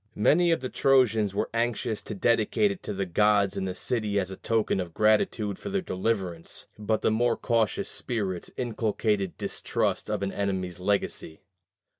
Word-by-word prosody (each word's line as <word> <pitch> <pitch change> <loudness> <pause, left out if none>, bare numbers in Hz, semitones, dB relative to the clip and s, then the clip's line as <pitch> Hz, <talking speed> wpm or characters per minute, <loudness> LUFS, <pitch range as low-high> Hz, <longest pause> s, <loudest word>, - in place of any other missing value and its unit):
Many 165 +12 +4
of 165 - +1
the 130 - -3
Trojans 115 -7 +3
were - - -1
anxious 115 -2 -1
to 105 - -6
dedicate 115 - +2
it 195 - -7
to 105 - -5
the 100 0 -1
gods 100 +2 +3
in 95 - -2
the 90 -1 -3
city 105 -2 -1
as 95 -1 -2
a - - -5
token 110 -1 0
of 85 -3 -5
gratitude 105 -1 +2
for - - -6
their 195 -1 -1
deliverance; 95 - -3
but 110 +1 -1
the - - +3
more 115 +2 +2
cautious 115 -3 0
spirits 100 -7 -3
inculcated 110 -5 -1
distrust - - -2
of - - -1
an 100 - -1
enemy's 95 -3 -2
legacy. 90 -4 -2
105 Hz, 170 wpm, -27 LUFS, 95-115 Hz, -, Many